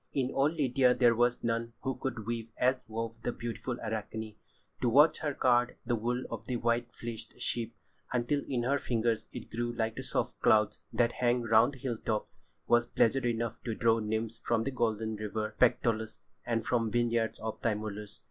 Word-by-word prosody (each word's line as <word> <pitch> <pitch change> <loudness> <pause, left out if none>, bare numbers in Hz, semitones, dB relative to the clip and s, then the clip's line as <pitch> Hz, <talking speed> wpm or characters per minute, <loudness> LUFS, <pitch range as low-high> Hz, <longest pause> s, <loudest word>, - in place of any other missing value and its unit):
In 130 -2 +1
all 135 +2 +3
Lydia 135 -5 +3
there 120 -1 +5
was 120 +1 +2
none 115 0 -1
who 135 0 -1
could 125 -3 -4
weave 115 0 -3
as 130 +1 +2
wove 115 +1 -4
the 120 - -1
beautiful 120 +1 -4
Arachne. 110 0 -4 0.5
To 125 - +3
watch 145 +7 +6
her 145 -3 -2
card 125 -1 +3
the 120 0 +1
wool 120 +3 -1
of - - -5
the 125 - -1
white 120 0 0
fleeced 115 -2 -8
sheep 115 -1 -2 0.4
until 125 +4 0
in 125 -3 -1
her 140 +3 +2
fingers 115 -2 0
it - - -8
grew 120 +1 -1
like 110 -1 -1
the - - -2
soft - - -2
clouds 105 -1 +4
that 120 -1 +2
hang 120 0 +1
round 115 +3 +5
the - - -10
hill 120 -5 -2
tops, 110 -1 -3 0.2
was 120 0 +3
pleasure 120 +2 +2
enough 115 -1 -2
to 115 -3 -2
draw 115 0 +3
nymphs 110 +1 -2
from 115 -1 +1
the 135 - -2
golden 110 -3 -1
river 110 +1 -3
Pactolus 110 -3 +2 0.3
and 115 -2 0
from 115 -3 +1
the 115 - 0
vineyards 115 -1 +1
of 110 0 -5
Tymolus. 105 -2 -3
115 Hz, 190 wpm, -31 LUFS, 110-125 Hz, 0.5 s, watch